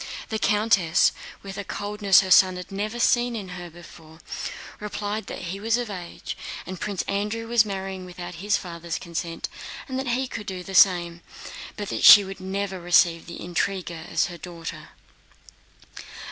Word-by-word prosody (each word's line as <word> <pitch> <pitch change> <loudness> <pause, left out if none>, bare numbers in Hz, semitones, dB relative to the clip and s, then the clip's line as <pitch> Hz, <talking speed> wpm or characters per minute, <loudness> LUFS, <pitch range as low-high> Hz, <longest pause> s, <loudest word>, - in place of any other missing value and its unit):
The 220 - -2
countess, 205 -6 +3 0.3
with 195 0 -7
a - - -3
coldness 205 -1 +3
her 190 -1 -4
son 185 0 +7
had 180 +1 -8
never 210 +4 -3
seen 240 0 +3
in 200 -4 -5
her 175 -1 -7
before, 160 -1 -14 0.6
replied 210 +1 -4
that - - -6
he 195 - -6
was 225 +3 +1
of 240 -3 -3
age, 180 -3 -7 0.3
that 185 -1 -7
Prince 200 -3 -2
Andrew 210 +3 -2
was 235 -2 +4
marrying 190 -2 -5
without 180 -1 -8
his 205 0 +2
father's 170 -2 -5
consent, 170 0 -4 0.4
and 260 -1 -3
he 255 +2 0
could 210 -4 -7
do 185 -2 -5
the 195 - -8
same, 175 -3 +4 0.6
but 205 -1 -4
that - - -3
she 205 - +11
would 195 0 -8
never 190 0 -3
receive 170 -1 +3
that 170 - -8
intriguer 175 -2 -3
as - - +2
her 175 -2 -8
daughter. 170 -2 -8
195 Hz, 165 wpm, -25 LUFS, 175-210 Hz, 0.6 s, she